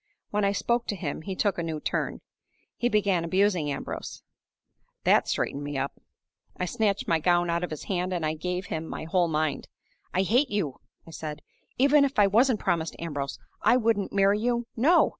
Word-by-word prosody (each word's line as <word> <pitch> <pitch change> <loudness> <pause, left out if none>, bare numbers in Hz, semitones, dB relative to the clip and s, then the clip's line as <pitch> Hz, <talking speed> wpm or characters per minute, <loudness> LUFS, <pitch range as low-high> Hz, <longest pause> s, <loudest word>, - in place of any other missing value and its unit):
When 210 0 +1
I 200 - +3
spoke 235 +3 0
to 205 - -1
him 160 -6 -4
he 190 +3 -5
took 200 -2 0
a - - 0
new 160 -2 -3
turn; - - -2 0.5
he 240 - 0
began 200 -6 +2
abusing 185 -2 +2
Ambrose. 140 - -6 0.8
That - - +4
straightened 140 - -1
me 145 -1 -4
up. 135 +1 -3 0.6
I 180 - -1
snatched 205 0 0
my 165 -1 +3
gown 175 +1 +2
out 170 +1 0
of 180 - -2
his 155 - -6
hand, 180 -1 -1
and 175 -3 -1
I 155 - 0
gave 180 +3 -3
him 160 -1 -4
my - - -5
whole 175 +2 +2
mind. 155 -1 -1 0.5
'I 185 - +3
hate 250 +8 +3
you!' 180 -10 -2 0.2
I 165 - -12
said. 155 -1 -6 0.3
'Even 280 +2 +5
if 275 0 -1
I 205 - +7
wasn't 225 +3 +3
promised 165 -2 0
to - - -9
Ambrose, 145 -4 -3 0.2
I 245 - +5
wouldn't 225 -4 +1
marry 200 +1 +3
you 240 +1 0
no! 315 +9 +5
185 Hz, 195 wpm, -27 LUFS, 160-210 Hz, 0.8 s, I